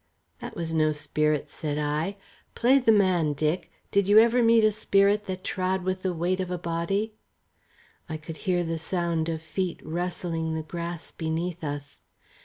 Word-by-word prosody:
"That - - -7
was 165 -1 -3
no 155 -1 +3
spirit," 150 0 0
said 150 -2 -4
I. 150 +6 -1 0.4
"Play 260 +3 +5
the 240 -4 +4
man, 185 -7 +3
Dick. 155 +4 -1 0.2
Did 200 -1 +3
you 205 +1 +6
ever 235 +2 +6
meet 230 -1 +5
a 215 - +5
spirit 205 0 +2
that 185 -1 -4
trod 185 0 -1
with 185 0 -1
the 185 - 0
weight 175 +2 0
of 185 -1 -2
a 180 - -2
body?" 170 +6 -1 1.0
I 160 - -3
could 155 +1 -8
hear 175 -1 +2
the 165 -1 -2
sound 170 -1 -1
of 160 -1 -3
feet 175 +2 -2
rustling 165 -1 -2
the 160 - -3
grass 170 +1 -6
beneath 165 +2 -3
us. 145 -1 -5
175 Hz, 175 wpm, -27 LUFS, 160-190 Hz, 1.0 s, you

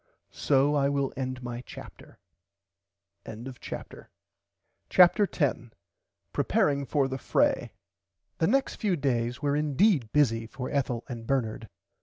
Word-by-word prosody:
So 140 +1 +2
I 140 -1 +2
will 140 -1 -1
end 130 -1 -4
my 120 0 -5
chapter. - - -12 1.1
[Pg - - -8
95] 130 -1 -8 0.8
CHAPTER 185 +3 +6
10 125 -9 -2 0.6
PREPARING 140 -1 +1
FOR 140 -3 +1
THE 135 0 -5
FRAY - - +1 0.7
The 160 - +3
next 270 +4 +1
few 200 -4 0
days 120 -4 -1
were 145 0 +1
indeed 150 - +2
bussy 115 -6 +2
for 130 +2 -6
Ethel 130 -4 -1
and 115 -4 -7
Bernard. 115 -5 -1
135 Hz, 125 wpm, -28 LUFS, 120-145 Hz, 1.1 s, CHAPTER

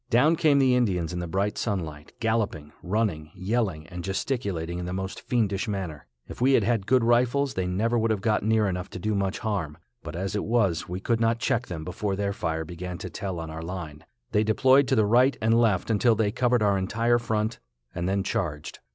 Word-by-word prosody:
Down 145 +7 +4
came 155 -3 +3
the 130 -2 +4
Indians 90 -9 +1
in 90 - -3
the 85 - -4
bright 100 +4 -1
sunlight, 80 -8 -4
galloping, 110 -10 -1
running, 90 -6 -1
yelling, 95 -6 -1
and 90 +1 -7
gesticulating 95 -4 -2
in 90 - -4
the 90 - -4
most 95 0 -4
fiendish 105 -5 0
manner. 95 -8 -4 0.2
If - - -10
we 135 +2 +4
had - - +4
had 115 -5 0
good 130 0 +4
rifles 125 +4 +2
they 95 -1 -1
never 115 +6 +1
would 115 0 +1
have 110 -2 +1
got 110 0 +1
near 110 0 +2
enough 90 0 -3
to - - -6
do 110 +4 -1
much 100 0 -1
harm, 95 -9 -3 0.2
but - - -7
as 95 +3 -3
it 105 - -1
was 100 -9 +1
we 90 +1 -3
could 115 +4 0
not 115 0 +2
check 120 +1 0
them 80 -3 -5
before 95 +3 -2
their 100 0 -1
fire 80 -3 -2
began 90 +2 -6
to - - -7
tell 95 -4 -4
on 80 -1 -6
our 80 +1 -6
line. 80 -3 -6 0.3
They 105 - +3
deployed 130 +5 +4
to - - +2
the 110 - +4
right 125 +6 +4
and 115 +1 +3
left 110 -2 +2
until 115 +2 +3
they 105 -1 +1
covered 125 -1 +2
our 100 -1 +3
entire 115 +5 +1
front, 110 -1 -1 0.3
and 85 +2 -2
then 100 0 +1
charged. 75 -6 -3
100 Hz, 220 wpm, -26 LUFS, 90-115 Hz, 0.3 s, Down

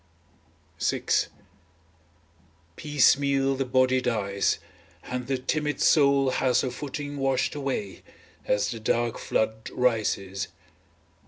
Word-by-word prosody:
VI - - 0 1.7
Piecemeal 140 0 +3
the 135 0 -2
body 130 0 +2
dies, 100 -5 0 0.5
and 125 -1 -5
the 135 -1 0
timid 150 +3 -2
soul 140 -3 +4
has 130 -1 +2
her 130 - -2
footing 145 +2 -6
washed 135 -1 0
away, 135 -9 -4 0.5
as 105 - +1
the 115 - -5
dark 115 +1 0
flood 110 0 -1
rises. 100 -5 0
130 Hz, 100 wpm, -26 LUFS, 115-140 Hz, 1.7 s, soul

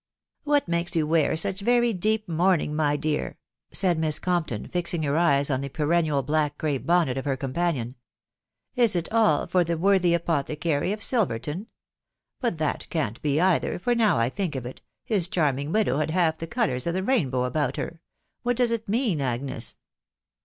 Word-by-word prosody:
"What 290 -4 +2
makes 170 +1 +1
you 160 -2 +2
wear 160 -1 +2
such 190 +4 0
very 240 +1 +3
deep 215 +3 0
mourning, 165 -2 +1
my 145 -1 +1
dear? 150 0 -2 0.2
" - - -65
said 175 -4 +2
Miss 155 -2 +2
Compton^ 170 - -2
fixing 175 -2 -1
her 140 0 0
eyes 145 -4 +2
on 130 0 0
the 140 - -4
perennial 155 -1 +1
black 150 +1 0
crape 145 -4 -2
bonnet 165 -7 +2
of 130 - -7
her 135 -2 0
companion. 135 -2 -2 0.8
"Is 235 -6 +4
it 170 -1 -2
all 220 -10 +3
for 180 -1 +2
the 170 0 -2
worthy 180 -1 +3
apothecary 160 0 -1
of 210 0 -1
Silverton?.... 180 - -1 0.7
But 235 -10 -1
that 155 -1 -2
can't 130 - -2
be 145 0 +1
either; 185 0 +2
for 245 +7 0
now 225 - +3
I 115 +1 +2
think 180 -1 -3
of 130 -2 -4
it, 125 - -8 0.2
his 195 -6 +1
charming 145 -4 0
widow 210 -7 +1
had 155 0 0
half 160 -1 +1
the 165 - -5
colours 175 - -1
of 170 - -1
the 190 - -1
rainbow 140 - +1
about 145 +4 -1
Tier.... 165 0 -5 0.4
What 245 -1 0
does 245 -2 +2
it 225 -3 -3
mean, 215 - +1
Agnes 125 -2 -3
165 Hz, 185 wpm, -25 LUFS, 145-190 Hz, 0.8 s, Is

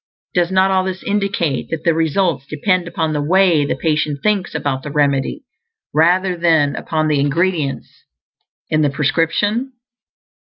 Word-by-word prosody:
Does 175 0 +1
not 190 0 +3
all 190 -1 +2
this 185 0 -5
indicate 200 -8 -1
that 160 -1 -4
the 170 - +3
results 160 -3 0
depend 180 +4 0
upon 160 -2 -2
the 150 - -1
way 170 -1 +3
the - - -1
patient 150 -3 -1
thinks 205 -3 0
about 135 -2 -2
the 150 - -7
remedy, 140 - 0 0.5
rather 180 +4 +3
than 160 -4 +2
upon 155 -1 -1
the 150 -2 +1
ingredients 150 0 -1 0.6
in 155 - +1
the 145 - +2
prescription? 170 - 0
165 Hz, 150 wpm, -18 LUFS, 150-185 Hz, 0.6 s, not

